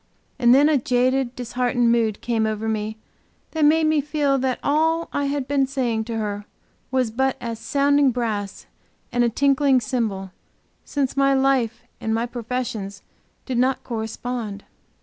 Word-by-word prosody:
And 240 Hz, -2 st, +5 dB
then 285 Hz, +2 st, +6 dB
a 305 Hz, -3 st, +3 dB
jaded, 255 Hz, +1 st, +1 dB
disheartened 245 Hz, -1 st, 0 dB
mood 225 Hz, -3 st, +1 dB
came 225 Hz, -2 st, 0 dB
over 215 Hz, 0 st, -2 dB
me 220 Hz, 0 st, -2 dB, 0.5 s
that 315 Hz, -1 st, -1 dB
made 315 Hz, +2 st, +5 dB
me 310 Hz, -1 st, +3 dB
feel 290 Hz, -2 st, +1 dB
that 260 Hz, -1 st, 0 dB
all 320 Hz, +3 st, +1 dB
I 285 Hz, -, 0 dB
had 280 Hz, -2 st, -2 dB
been 275 Hz, -1 st, +2 dB
saying 240 Hz, -5 st, -1 dB
to 230 Hz, -1 st, -4 dB
her 205 Hz, -1 st, -3 dB, 0.4 s
was 255 Hz, -3 st, 0 dB
but 265 Hz, +3 st, 0 dB
as 230 Hz, -1 st, -5 dB
sounding 280 Hz, +4 st, +3 dB
brass 220 Hz, -5 st, -3 dB, 0.5 s
and 245 Hz, -, +2 dB
a 240 Hz, -, +3 dB
tinkling 275 Hz, +1 st, +3 dB
cymbal, 215 Hz, -5 st, -2 dB, 0.5 s
since 275 Hz, -3 st, -2 dB
my 275 Hz, 0 st, +3 dB
life 265 Hz, -4 st, +1 dB, 0.2 s
and 220 Hz, 0 st, -1 dB
my 230 Hz, +1 st, 0 dB
professions 230 Hz, -4 st, -4 dB, 0.4 s
did 255 Hz, -3 st, -1 dB
not 260 Hz, +1 st, +1 dB
correspond. 225 Hz, -2 st, -4 dB
250 Hz, 155 wpm, -23 LUFS, 225-275 Hz, 0.5 s, then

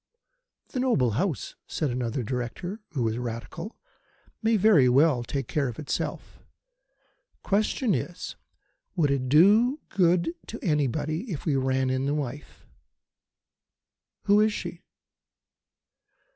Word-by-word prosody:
"The 255 Hz, -, -3 dB
noble 190 Hz, -, +2 dB
House," 150 Hz, -, -2 dB
said 150 Hz, -5 st, -1 dB
another 125 Hz, +1 st, -2 dB
Director, 130 Hz, -, -4 dB
who 130 Hz, -5 st, 0 dB
was 115 Hz, +1 st, -1 dB
Radical, 120 Hz, -, -6 dB, 0.6 s
"may 225 Hz, 0 st, +3 dB
very 190 Hz, -11 st, +5 dB
well 135 Hz, -1 st, +4 dB
take 135 Hz, +1 st, -3 dB
care 145 Hz, -3 st, 0 dB
of 120 Hz, -, -6 dB
itself. 150 Hz, -, -4 dB, 1.0 s
Question 215 Hz, +3 st, +1 dB
is, 175 Hz, 0 st, -4 dB, 0.6 s
Would 155 Hz, -6 st, +2 dB
it 130 Hz, -2 st, -1 dB
do 210 Hz, -, +5 dB
any -, -, -19 dB
good 175 Hz, -2 st, +3 dB
to 230 Hz, -, -6 dB
anybody 155 Hz, -, -1 dB
if 155 Hz, -, -5 dB
we 150 Hz, -4 st, +1 dB
ran 130 Hz, 0 st, +1 dB
in 130 Hz, +1 st, 0 dB
the 145 Hz, -, 0 dB
wife?" 145 Hz, 0 st, -6 dB, 1.6 s
"Who 205 Hz, 0 st, +4 dB
is 215 Hz, 0 st, +3 dB
she?" -, -, -6 dB
150 Hz, 125 wpm, -27 LUFS, 130-195 Hz, 1.6 s, very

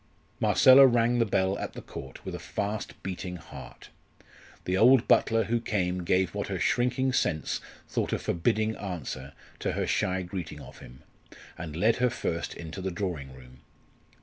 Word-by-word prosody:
Marcella 135 Hz, +1 st, +7 dB
rang 120 Hz, 0 st, +2 dB
the 115 Hz, -, +3 dB
bell 95 Hz, -1 st, +1 dB
at -, -, -5 dB
the -, -, -8 dB
Court 65 Hz, -1 st, -10 dB
with -, -, -5 dB
a -, -, -5 dB
fast 105 Hz, +1 st, -4 dB
beating 90 Hz, -1 st, -5 dB
heart. 85 Hz, -1 st, -11 dB, 0.8 s
The 90 Hz, -, 0 dB
old 125 Hz, +4 st, +5 dB
butler 115 Hz, 0 st, +4 dB
who 115 Hz, +2 st, -1 dB
came 90 Hz, -5 st, -1 dB
gave 90 Hz, +1 st, +1 dB
what 100 Hz, 0 st, -3 dB
her 95 Hz, -, -3 dB
shrinking 125 Hz, +8 st, +1 dB
sense 80 Hz, -10 st, 0 dB, 0.3 s
thought -, -, -2 dB
a -, -, +1 dB
forbidding 110 Hz, +6 st, 0 dB
answer 70 Hz, -7 st, -6 dB, 0.3 s
to -, -, -1 dB
her -, -, -1 dB
shy 95 Hz, 0 st, 0 dB
greeting 90 Hz, -1 st, -6 dB
of -, -, -12 dB
him, 65 Hz, +2 st, -14 dB, 0.5 s
and 80 Hz, -3 st, -7 dB
led 110 Hz, +7 st, +3 dB
her 125 Hz, 0 st, +3 dB
first 85 Hz, -8 st, -3 dB
into 85 Hz, +3 st, -7 dB
the 95 Hz, -, -2 dB
drawing 85 Hz, -7 st, -4 dB
room. 65 Hz, 0 st, -15 dB
95 Hz, 170 wpm, -28 LUFS, 85-115 Hz, 0.8 s, Marcella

